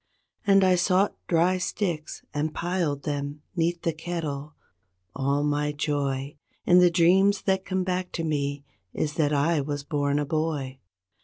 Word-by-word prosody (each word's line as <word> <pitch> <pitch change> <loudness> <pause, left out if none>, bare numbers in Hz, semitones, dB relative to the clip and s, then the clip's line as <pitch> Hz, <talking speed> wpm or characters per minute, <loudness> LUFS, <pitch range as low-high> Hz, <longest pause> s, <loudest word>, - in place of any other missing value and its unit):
And 195 -1 +6
I 185 -1 +5
sought 185 +2 +2
dry 175 +2 +2
sticks 175 -5 -3
and 150 +1 -2
piled 170 -5 -1
them 145 0 -4
'neath 170 0 0
the 165 - 0
kettle—all 140 - -5
my 150 0 0
joy 145 -2 -2 0.3
In 180 0 +6
the 180 -1 +6
dreams 190 +4 +4
that 190 0 0
come 185 -1 -1
back 180 0 -2
to 165 - -2
me 145 -2 -2 0.3
is 150 -1 -1
that 150 -2 +1
I 150 +2 +2
was 145 0 -4
born 145 -1 0
a 145 - 0
boy. 145 -4 -2
155 Hz, 150 wpm, -26 LUFS, 145-175 Hz, 0.3 s, And